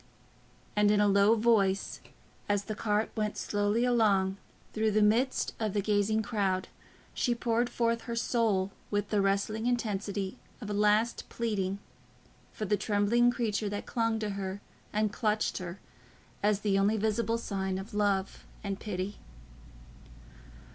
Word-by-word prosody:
And 210 0 +4
in 210 0 +4
a 205 - +4
low 200 +2 +5
voice, 210 -4 +2 0.5
as 205 0 +2
the 215 - -4
cart 210 0 0
went 215 -1 -1
slowly 205 +3 +1
along 200 -6 +3 0.4
through 220 0 +1
the 215 0 +3
midst 235 +5 +2
of 215 -3 -1
the 205 - +1
gazing 210 +1 +1
crowd, 195 -4 -1 0.4
she 240 -2 +1
poured 235 +1 0
forth 230 -1 0
her 235 - -1
soul 225 -5 +1 0.2
with 205 0 -1
the 210 -2 +3
wrestling 200 +3 0
intensity 205 -3 -2 0.2
of 210 -4 -6
a - - -1
last 210 +3 +2
pleading, 200 -4 -1 0.7
for 215 - -4
the 210 +1 +1
trembling 210 +4 +3
creature 220 -3 -1
that 205 0 -4
clung 230 -1 0
to 215 -1 -2
her 195 0 -4 0.3
and 210 -1 0
clutched 215 -3 0
her 180 0 -7 0.6
as 205 0 +2
the 200 -2 +2
only 205 +3 +3
visible 220 +2 0
sign 190 -4 -2
of 195 +3 -7
love 200 -2 0 0.2
and 200 -1 -3
pity. 200 -1 -4
210 Hz, 150 wpm, -30 LUFS, 200-225 Hz, 0.7 s, low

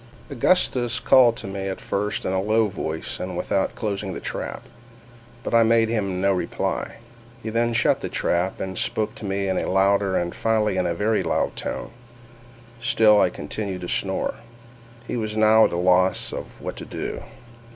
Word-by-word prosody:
Augustus 120 -5 +2
called 120 -2 +5
to 115 - -6
me 95 0 -4
at 95 - -4
first 105 +1 -2
in 95 - -1
a 95 - +1
low 110 +2 +2
voice 80 -5 -5
and - - -4
without - - -1
closing 100 -2 -3
the - - -5
trap—but 120 0 -9
I 115 - +6
made 115 0 +4
him 100 -5 -1
no 100 +1 +3
reply. 90 - -2 0.5
He 110 - -4
then 115 +1 +1
shut 115 - +2
the - - -4
trap, 90 +2 -1
and 95 -1 -4
spoke 110 0 -1
to 125 -4 -9
me 100 0 -1
in 95 - 0
a - - -2
louder, 95 0 +2
and 85 0 -2
finally 110 -3 +1
in 90 - +1
a 85 - -1
very 105 +2 +1
loud 85 -3 -1
tone—still 120 -2 -1
I - - +4
continued 95 +4 -5
to 90 - -5
snore. 95 -1 -1 0.7
He 120 - -3
was 110 -1 -3
now 110 +1 +6
at - - 0
a 85 - -2
loss 90 +1 +2 0.2
what - - -6
to - - -7
do. - - -5
110 Hz, 175 wpm, -23 LUFS, 95-115 Hz, 0.7 s, I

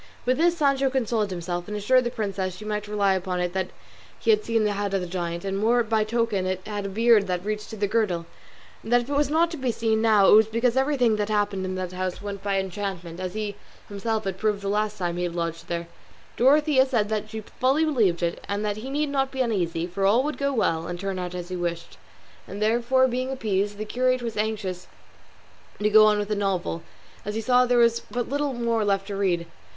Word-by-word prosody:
With 255 +3 +1
this 345 +1 +3
Sancho 275 -3 +2
consoled 230 -5 0
himself, 175 -1 -4
and 210 0 -4
assured 250 +5 +3
the - - +1
princess 195 -6 -3
she 215 - -10
might 210 -1 -3
rely 205 -2 +2
upon 185 -1 -2
it 180 0 -1
that 190 -1 -1 0.5
he - - +2
had 425 0 +3
seen 225 -1 +1
the 210 - +1
head 200 -1 -2
of 195 - 0
the - - -3
giant, 170 0 -4
and 195 0 -2
more 235 +3 +3
by 220 -1 +1
token 215 -4 0
it 185 0 -1
had 205 -1 -4
a - - -5
beard 220 0 +4
that 180 0 -2
reached 210 0 -3
to 220 - -7
the 205 - +1
girdle, 195 -6 0 0.6
and 225 - -8
that 245 0 +5
if 240 - -9
it - - 0
was 290 0 +2
not 330 +2 +2
to 330 - -5
be 260 -3 0
seen 220 -1 0
now 215 -3 +5
it - - +7
was 215 0 +7
because 230 +2 +1
everything 265 -5 +2
that 210 0 -1
happened 205 -2 0
in 185 0 -3
that 185 -1 -4
house 185 0 -3
went 200 -1 -6
by 200 -1 0
enchantment, 190 -3 -4
as 185 +1 -4
he 210 -2 -3 0.3
himself 215 +2 -2
had 190 -1 -4
proved 210 -2 0
the - - -3
last 210 +1 0
time 175 -2 -2
he 180 - -1
had 175 -1 -4
lodged 165 -1 -3
there. 170 0 -3 0.5
Dorothea 275 +1 +4
said 215 -4 -1
she 220 0 -5
fully 265 +8 +1
believed 210 - +1
it, 170 0 -2
and 205 +1 -1
that 205 0 -1
he 240 +5 -6
need 295 +2 -1
not 270 -1 0
be 265 -1 -3
uneasy, 175 -8 0
for 180 +2 -4
all 230 +6 +4
would 300 +2 -3
go 280 0 +1
well 165 -10 0
and 175 0 -5
turn 195 -1 -3
out 180 0 -4
as 175 0 -6
he 185 - -4
wished. 170 -1 -4 0.5
All - - -7
therefore 240 +5 +3
being 255 +1 -2
appeased, 205 -5 -1
the 215 - -4
curate 255 +2 0
was 230 -2 -4
anxious 210 -4 -3 0.9
to 210 +1 +2
go 215 0 +8
on 210 -1 +3
with 205 0 -2
the 210 - 0
novel, 190 -4 -1 0.4
as 210 +1 -4
he 225 - -1
saw 250 +2 +4
there 245 0 +3
was 235 -1 +4
but 245 -1 -2
little 285 0 -1
more 235 -2 0
left 195 -1 +1
to 200 0 -5
read. 180 -4 0
210 Hz, 240 wpm, -25 LUFS, 190-240 Hz, 0.9 s, go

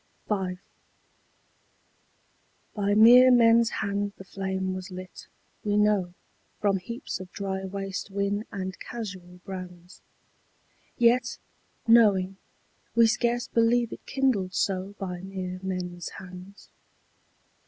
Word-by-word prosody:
V. 190 -3 -1 2.2
By 205 -1 0
mere 245 +4 +8
men's 235 -1 +6
hands 205 -2 -2
the - - -10
flame 190 0 -3
was 185 0 -6
lit, 185 0 -10 0.4
we 205 -1 +1
know, 205 -4 +2 0.4
From 200 -2 +2
heaps 235 +7 -6
of 185 -1 -10
dry 190 -1 -4
waste 195 0 -4
whin 200 +2 -1
and 190 -2 -5
casual 185 -6 -8
brands: 180 -1 -9 1.0
Yet, 240 +1 +3 0.5
knowing, 200 -5 +5 0.6
we 230 -1 +7
scarce 240 +1 +1
believe 235 0 +2
it - - -10
kindled 240 -9 0
so 195 +1 -1
By 180 -3 -5
mere 185 -1 -5
men's 180 -2 -4
hands. 185 +1 -12
195 Hz, 110 wpm, -27 LUFS, 185-225 Hz, 2.2 s, mere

